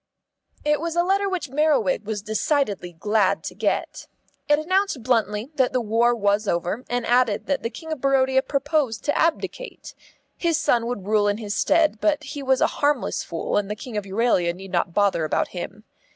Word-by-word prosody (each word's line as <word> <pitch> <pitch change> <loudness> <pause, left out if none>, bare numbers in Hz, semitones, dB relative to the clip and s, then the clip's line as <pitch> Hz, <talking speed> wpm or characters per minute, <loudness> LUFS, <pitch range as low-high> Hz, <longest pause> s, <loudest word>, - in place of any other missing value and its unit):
It 300 0 +2
was 335 0 -3
a 345 - +3
letter 395 +2 +1
which 345 -8 -3
Merriwig 290 -5 +2
was 210 -2 -3
decidedly 215 - -1
glad 205 +3 +1
to - - -5
get. - - -2 0.4
It 295 - +5
announced 370 - 0
bluntly 225 0 0
that 260 -2 +2
the 255 - +2
war 235 +1 +2
was 205 -1 +1
over, 175 +8 -1
and 245 -1 -1
added 240 -3 +2
that 280 - -1
the 230 - -2
King 320 +7 -9
of 310 -5 -4
Barodia 265 -1 +3
proposed 275 -4 -1
to 290 - +1
abdicate. 335 +9 -2 0.4
His 335 -2 0
son 240 -6 +1
would 235 -6 -4
rule 210 0 +2
in 205 0 +1
his 210 -2 -4
stead, 310 -10 +2
but 305 -2 +1
he 290 -1 -6
was 265 -1 +1
a - - +6 0.2
harmless 290 -2 +1
fool, 165 - -2
and 205 -1 -1
the 210 - -2
King 230 +2 -9
of 210 -1 -2
Euralia 190 -4 +1
need 190 +1 -10
not 175 -1 0
bother 200 -5 +2
about 155 - 0
him. 195 +4 -7
240 Hz, 195 wpm, -23 LUFS, 210-295 Hz, 0.4 s, a